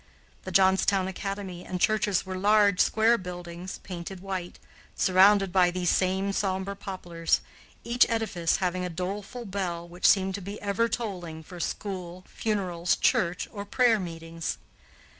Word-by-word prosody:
The 185 - -5
Johnstown 190 0 +3
academy 190 -1 -5
and 180 - -4
churches 210 -2 +2
were 185 0 -5
large 205 0 +4
square 225 +2 +4
buildings, 180 0 -7
painted 180 0 -7
white, 185 -2 -5 0.4
surrounded 195 +1 +5
by 180 -2 +5
these 175 -1 0
same 190 +1 +1
sombre 195 0 -1
poplars, 175 -4 -1 0.4
each 240 +1 +3
edifice 220 -8 0
having 180 -1 -1
a 180 - -2
doleful 200 +7 -5
bell 180 -4 -3
which 175 +1 +1
seemed 190 -1 +4
to 200 - -4
be 200 +3 -7
ever 205 +3 0
tolling 175 -10 -4
for 175 +2 -11
school, 185 -1 -5
funerals, 180 -5 -1
church, 180 -8 +1
or 200 -2 -6
prayer 230 +1 +3
meetings. 165 -2 -5
190 Hz, 140 wpm, -27 LUFS, 175-200 Hz, 0.4 s, surrounded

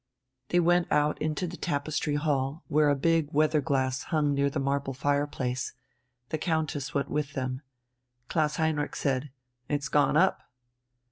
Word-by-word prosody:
They 175 - +3
went 175 0 +3
out 150 0 +2
into 155 +3 -1
the 175 0 -6
tapestry 150 -1 -1
hall, 145 +1 -1
where 150 -1 +3
a 145 - +3
big 160 +1 +1
weather 155 +1 +3
glass 130 -2 0
hung 150 -3 +1
near 140 0 +2
the 140 - -3
marble 140 -1 -1
fireplace. 140 -3 -1 0.6
The 155 - -2
Countess 155 -4 -1
went 140 - -1
with 150 -1 -1
them. 130 -1 -3 0.7
Klaus 150 0 +1
Heinrich 160 -2 0
said: 135 +1 -1 0.4
"It's 145 -1 -1
gone 145 +1 +3
up." 190 +4 +3
145 Hz, 150 wpm, -28 LUFS, 140-155 Hz, 0.7 s, They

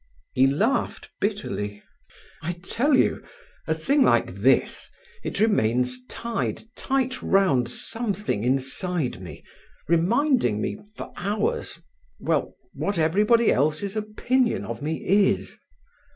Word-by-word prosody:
He 130 +1 +4
laughed 215 - 0
bitterly. 105 - -3 0.6
"I 170 +2 -2
tell 265 +9 +2
you—a - - -3
little 160 0 -3
thing 285 +1 +3
like 120 - +3
this—it 125 - -1
remains 125 - +2
tied 235 - -3
tight 265 -1 -1
round 140 -12 +2
something 205 - -2
inside 135 - -1
me, 85 -6 -10 0.4
reminding 175 - +2
me 205 - -3 0.2
for - - -8
hours—well, 450 - -3 0.2
what 200 -2 -2
everybody 210 +9 +4
else's 155 +9 0
opinion 230 +4 0
of - - -6
me 155 +2 -3
is." 200 +1 +2
190 Hz, 105 wpm, -25 LUFS, -, 0.6 s, He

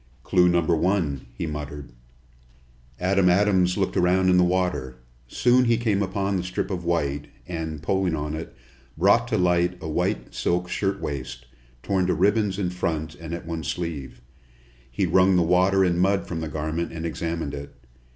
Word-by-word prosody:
"Clue 90 -1 +4
number 85 -1 +2
one!" 80 -7 0
he - - -2
muttered. 75 -2 -6 1.1
Adam 95 0 +3
Adams 90 -1 +3
looked 95 -2 -1
around 90 +1 +3
in 90 - +4
the 90 - +5
water. 90 -7 0 0.3
Soon 125 - +3
he 115 -1 +3
came 110 -4 0
upon 100 0 -1
the 90 - -2
strip 95 +2 -3
of 90 -2 -3
white, 75 -4 -1 0.2
and, 80 -3 -5
pulling 95 0 +1
on 75 0 -3
it, 80 -6 -6 0.4
brought 100 +8 +4
to 110 - 0
light 90 -1 +2
a 80 - -6
white 75 - -2
silk 90 +1 0
shirtwaist, 90 -8 -3 0.4
torn 95 -2 +1
to 90 - +1
ribbons 100 +2 +2
in 90 -3 -1
front 80 -3 -2
and 80 0 -9
at 85 - -8
one 80 -1 -4
sleeve. 70 -6 -5 0.7
He - - -1
wrung 95 0 +4
the 90 - +4
water 90 +3 +3
and 90 -2 +1
mud 95 +1 +2
from 85 - -4
the 80 - -3
garment 80 +2 -3
and 85 0 -5
examined 80 -2 -3
it. 70 0 -8
90 Hz, 170 wpm, -24 LUFS, 80-95 Hz, 1.1 s, the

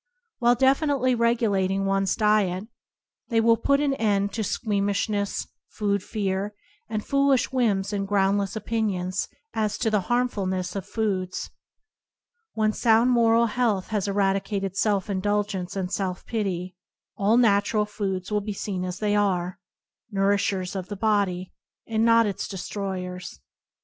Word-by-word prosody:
While 240 -1 +4
definitely 270 0 +2
regulating 205 -5 +1
one's 195 -1 +1
diet, 210 -2 +2 0.6
they 230 -2 +2
will 230 0 +5
put 280 +5 +2
an 285 -2 +1
end 205 -5 +1
to 225 - -2
squeam 205 -1 0
ishness, 200 0 -1 0.2
food 200 -2 -1
fear, 200 0 -2 0.3
and 215 -1 -3
foolish 275 -2 +2
whims 210 -6 +1
and 195 -1 -1
groundless 200 0 +1
opinions 205 -5 -1 0.3
as 215 -2 -1
to 220 - 0
the 210 -2 +2
harmfulness 195 -7 0
of 195 - -4
foods. 190 -5 -2 1.0
When 215 -1 +1
sound 230 +2 +4
moral 230 -1 +4
health 230 -6 0
has 210 -3 -1
eradicated 195 -1 0
self 200 -2 +1
indulgence 200 -1 -1
and 190 -1 -3
self 185 -2 -2
pity, 185 -5 -3 0.4
all 210 +3 +3
natural 210 -2 +3
foods 195 -2 -4
will 210 0 +1
be 210 0 -4
seen 190 -2 -3
as 180 -1 -4
they 210 -1 0
are 185 -3 0 0.3
— - - -50
nourishers 195 -1 0
of 185 -1 -4
the 205 - -6
body, 200 -4 0 0.3
and 225 -1 0
not 230 0 +5
its 200 -2 -3
de 195 - -6
stroyers. 180 - -5
205 Hz, 145 wpm, -25 LUFS, 195-225 Hz, 1.0 s, will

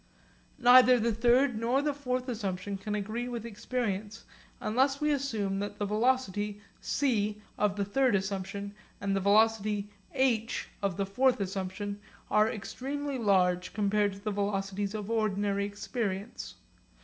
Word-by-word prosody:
Neither 250 0 +7
the 230 0 +1
third 240 +2 +3
nor 245 +5 +1
the 295 -1 +1
fourth 255 -2 -2
assumption 200 -4 -3
can 210 +2 -4
agree 215 +4 -3
with 235 -2 -5
experience 220 -2 -3 0.3
unless 265 +5 +1
we 300 0 +1
assume 220 -9 -1
that 205 +1 -4
the 205 - -1
velocity 210 -2 0 0.2
c 210 -6 0 0.2
of 205 -1 +1
the 200 -1 -1
third 250 +3 +2
assumption, 195 +1 -3 0.3
and 195 -1 -1
the - - +2
velocity 210 0 +2 0.2
h 240 -4 +1
of 195 -3 -1
the 200 - 0
fourth 250 +6 +2
assumption, 195 +1 -3 0.3
are 215 +1 +4
extremely 270 +6 -4
large 185 -4 +2
compared 205 -1 +2
to 195 - -10
the 210 +1 -3
velocities 200 0 -2
of 210 0 -4
ordinary 205 -2 0
experience. 205 0 -4
210 Hz, 140 wpm, -30 LUFS, 200-245 Hz, 0.3 s, Neither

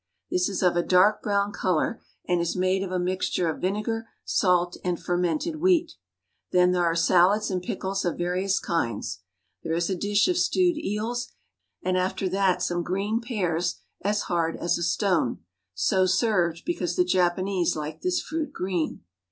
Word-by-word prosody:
This 180 +1 +1
is 195 -1 -2
of 180 -1 +3
a 175 - +3
dark 185 +4 +4
brown 200 -1 0
color, 185 +3 -1 0.3
and 175 -1 +2
is 170 - -1
made 185 +1 +1
of 190 -1 -4
a 185 - 0
mixture 180 -1 0
of 160 - -3
vinegar, 215 +4 -2 0.2
salt, 180 -2 +2
and 180 -2 -1
fermented 175 - -1
wheat. 340 -1 +2 0.6
Then 180 0 +4
there 180 -1 +2
are 165 0 +1
salads 185 +5 +3
and 185 -1 -1
pickles 190 +2 -3
of 175 - -1
various 180 +3 0
kinds. 115 - -2 0.4
There 165 0 -2
is 170 +2 0
a - - +1
dish 205 +3 +2
of 360 -1 +1
stewed 360 -1 +3
54 - - -4
JAPAN - - -9
eels, 235 +4 -3 0.5
and 185 0 +1
after 190 +1 -1
that 190 -1 +1
some 175 0 0
green 200 +6 -1
pears 180 -8 -1 0.3
as 205 +1 0
hard 165 -1 -1
as 170 - 0
a - - -5
stone, 170 - 0 0.3
so 185 - +2
served 180 -6 +1
because 180 - -2
the 180 - +3
Japanese 180 0 +1
like 155 0 -5
this 365 -1 +1
fruit 315 -1 -3
green. 180 - -3
185 Hz, 175 wpm, -26 LUFS, 175-205 Hz, 0.6 s, dark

